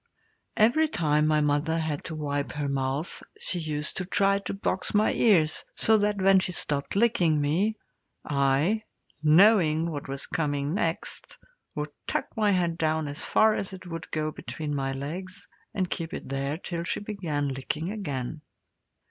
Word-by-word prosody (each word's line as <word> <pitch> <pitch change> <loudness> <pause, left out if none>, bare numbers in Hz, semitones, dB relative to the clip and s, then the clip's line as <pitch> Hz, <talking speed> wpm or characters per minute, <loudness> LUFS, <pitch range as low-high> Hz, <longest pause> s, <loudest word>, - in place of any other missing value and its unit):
Every 245 +9 +4
time 150 - +1
my 155 -1 +3
mother 150 +2 +1
had 155 -3 -2
to 160 - -5
wipe 145 -2 -2
her 145 -1 -2
mouth 140 +3 -2 0.2
she 180 - -2
used 155 -2 -2
to 185 - -2
try 195 +2 +2
to 195 - -5
box 195 0 -2
my 210 +1 +4
ears, 165 -9 +3
so 220 -1 +4
that 205 0 +1
when 190 0 +5
she 180 -1 -2
stopped 145 -1 0
licking 180 -8 +3
me, 175 +10 +1 0.5
I, 140 +9 +2 0.4
knowing 165 -1 +5
what 145 -2 -5
was 135 0 -3
coming 145 -1 -1
next, 170 -4 -3 0.4
would 150 -1 -3 0.2
tuck - - -2
my 215 -2 +2
head 175 -3 +1
down 155 -1 +1
as 145 +1 -3
far 220 0 +4
as 195 -2 -3
it 185 0 -9
would 165 -2 -7
go 155 0 -1
between 150 -1 -5
my 135 -1 -1
legs, 170 +8 -6 0.3
and 185 -2 -1
keep 165 -2 -4
it - - -7
there 135 +2 -2
till 170 -1 -4
she - - -2
began 170 -9 -2
licking 150 +6 -3
again. 150 - -4
160 Hz, 165 wpm, -27 LUFS, 145-190 Hz, 0.5 s, when